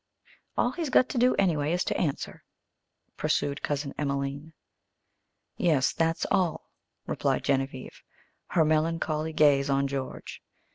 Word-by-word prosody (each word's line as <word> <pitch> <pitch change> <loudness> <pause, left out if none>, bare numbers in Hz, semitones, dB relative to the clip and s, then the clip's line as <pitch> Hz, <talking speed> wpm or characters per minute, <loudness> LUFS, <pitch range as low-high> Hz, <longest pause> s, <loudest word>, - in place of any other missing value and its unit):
"All 245 - +2
he's 325 0 -3
got 255 0 +4
to 255 - -1
do, 250 +1 +4
anyway, 160 -5 +1
is 180 - +1
to - - -2
answer," 145 -5 -3 0.7
pursued 140 0 0
Cousin 145 -1 -2
Emelene. 140 +2 -3 1.0
"Yes, 150 -6 +2
that's 165 0 0
all," 175 -4 0 0.3
replied - - -1
Genevieve, 135 -1 -2 0.5
her 160 -3 +2
melancholy 155 0 0
gaze 145 -3 +4
on 140 0 +2
George. 135 -1 -6
155 Hz, 125 wpm, -28 LUFS, 140-165 Hz, 1.0 s, got